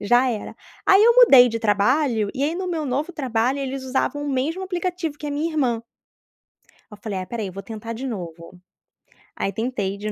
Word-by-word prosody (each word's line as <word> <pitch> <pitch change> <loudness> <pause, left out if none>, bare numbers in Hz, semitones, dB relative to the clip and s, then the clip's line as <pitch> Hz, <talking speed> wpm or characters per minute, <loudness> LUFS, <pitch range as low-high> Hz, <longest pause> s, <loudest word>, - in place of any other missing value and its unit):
Já 245 +5 +3
era. 220 -3 -5 0.3
Aí 390 +2 +6
eu 470 +1 +7
mudei 270 - +8
de 230 - -3
trabalho, 220 +1 +1
e 270 - -2
aí 310 +4 0
no 370 +1 -3
meu 325 -4 -2
novo 285 +7 -2
trabalho, 255 -3 0
eles 270 -1 -4
usavam 270 +3 -1
o - - -3
mesmo 290 +8 -1
aplicativo 355 -4 -3
que 300 - -6
a - - -3
minha 300 +3 -1
irmã. 250 -7 0 1.1
Aí 210 - -11
eu - - -31
falei: 205 -4 -3
"Ah 185 - -3
espera 230 +4 -5
aí - - -3
eu 185 - -9
vou 195 - -6
tentar 225 +2 -7
de 260 +4 -5
novo." 175 -4 -7 0.8
Aí 195 - -2
tentei 210 -4 -3
de 210 +1 -4
255 Hz, 215 wpm, -22 LUFS, 215-300 Hz, 1.1 s, mudei